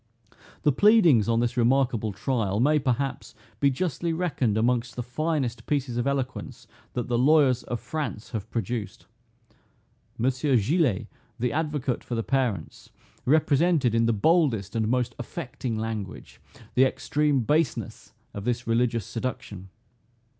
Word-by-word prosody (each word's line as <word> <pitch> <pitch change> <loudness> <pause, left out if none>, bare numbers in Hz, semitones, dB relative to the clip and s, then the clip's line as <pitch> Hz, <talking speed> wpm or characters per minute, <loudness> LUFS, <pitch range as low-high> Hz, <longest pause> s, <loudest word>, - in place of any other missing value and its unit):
The 150 - +4
pleadings 165 - +5
on 115 0 +2
this 120 +1 -1
remarkable 120 -3 +2
trial 105 -1 -1
may, 150 +5 +4
perhaps, 135 +1 -2 0.2
be 140 - +4
justly 165 +3 -2
reckoned 145 - 0
amongst 120 +1 0
the 125 - -3
finest 125 -3 -2
pieces 140 -4 -1
of 120 +2 -1
eloquence 135 -2 -3 0.3
that 120 - -3
the 120 -1 0
lawyers 135 -2 +4
of 120 - -3
France 150 -9 -5
have 110 -1 -5
produced. 115 -4 -4 1.1
Monsieur 130 +2 +1
Gillet, 130 - +1 0.3
the 125 +1 -1
advocate 150 -5 -1
for 120 - -4
the 115 - -1
parents, 120 - -2 0.4
represented, 150 -2 +3
in 115 0 +3
the - - +3
boldest 115 - +2
and 110 -1 +1
most 125 0 0
affecting 120 -3 -5
language, 110 -3 -6 0.3
the 130 - +5
extreme 145 +1 +1
baseness 150 +3 -1 0.2
of 100 - -6
this 120 +1 -1
religious 115 -2 +1
seduction. 115 -6 -5
125 Hz, 135 wpm, -26 LUFS, 115-145 Hz, 1.1 s, pleadings